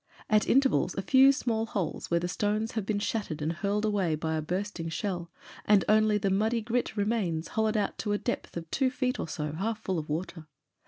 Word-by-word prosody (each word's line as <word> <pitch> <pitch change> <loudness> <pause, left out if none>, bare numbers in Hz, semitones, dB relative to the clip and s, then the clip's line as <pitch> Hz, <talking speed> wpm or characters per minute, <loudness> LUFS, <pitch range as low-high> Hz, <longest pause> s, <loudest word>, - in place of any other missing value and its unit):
At 215 0 +4
intervals, 270 +1 +3
a 195 - -1
few 265 +6 +6
small 225 -4 -1
holes, 195 -6 -3
where 170 - +2
the 175 - -2
stones 210 +4 -1
have 220 -4 -3
been 215 - 0
shattered 205 -6 -2
and 155 +2 -1
hurled 200 +4 -1
away 195 -7 +1
by 160 +1 -2
a 155 - -1
bursting 180 +1 -3
shell 175 -1 -3 0.3
and 205 -2 +4
only 215 0 +4
the 200 -1 0
muddy 220 +4 +1
grit 235 0 -2
remains 200 -6 0
hollowed 220 0 +1
out 205 -2 -1
to 210 - -2
a 205 - +2
depth 240 -5 -4
of 165 -1 -7
two 265 -2 +2
feet 255 -2 -1
or - - -3
so, 150 -1 -3
half 205 +8 -2
full 185 -3 -1
of 155 - -7
water. 160 0 -4
205 Hz, 215 wpm, -29 LUFS, 170-220 Hz, 0.3 s, few